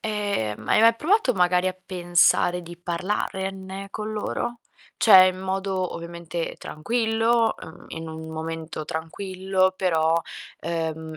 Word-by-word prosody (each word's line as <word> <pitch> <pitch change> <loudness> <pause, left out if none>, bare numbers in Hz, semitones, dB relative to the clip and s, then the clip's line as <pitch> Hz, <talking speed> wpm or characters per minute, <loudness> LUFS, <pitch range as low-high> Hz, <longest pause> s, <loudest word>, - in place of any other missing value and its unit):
Ehm, 205 - -2
ma - - -1
hai - - +5
mai 230 +1 +6
provato 335 - +2
magari 180 -2 +2
a - - -2
pensare 175 -1 +2
di 170 0 -10
parlarne 190 +2 -3
con 215 0 -5
loro? 235 +2 -3 0.4
Cioè, 190 -4 +8
in 185 0 -1
modo 190 -1 -2
ovviamente 170 0 -5
tranquillo, 225 +5 +1
uhm, 160 +2 -11
in 160 0 -6
un 160 0 -7
momento 160 -1 -5
tranquillo, 185 +3 -1
però, 165 -4 +2 0.5
uhm, 160 -1 -3
185 Hz, 130 wpm, -24 LUFS, 165-200 Hz, 0.5 s, Cioè